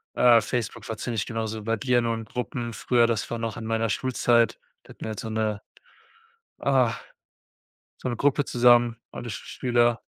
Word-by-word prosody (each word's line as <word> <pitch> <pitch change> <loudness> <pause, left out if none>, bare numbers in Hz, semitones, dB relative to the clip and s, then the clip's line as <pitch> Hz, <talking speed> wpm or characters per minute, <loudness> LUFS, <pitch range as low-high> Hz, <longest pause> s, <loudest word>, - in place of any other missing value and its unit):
Äh, 120 -2 +6
Facebook 115 0 -4
war 115 - -3
ziemlich 115 -3 -2
genauso 110 -1 -3
wie - - -10
bei 115 +1 0
dir, 125 +1 +2
nur 115 -1 0
in 115 - -6
Gruppen. 120 +1 -4
Früher, 120 0 +2
das 115 -3 -1
war 120 - -3
noch 115 -2 -4
in 110 - -6
meiner 115 0 0
Schulzeit, 120 -1 +2 0.2
da - - -23
hatten - - -15
wir - - -3
halt 110 - -5
so 110 - -5
'ne 110 -2 -1 1.0
ah, 130 -4 +2 1.0
so 130 - -4
'ne 120 - -2
Gruppe 145 +2 +2
zusammen, 120 -2 +4 0.2
alle 120 - -7
Schüler 120 0 0
115 Hz, 185 wpm, -26 LUFS, 110-120 Hz, 1.0 s, Äh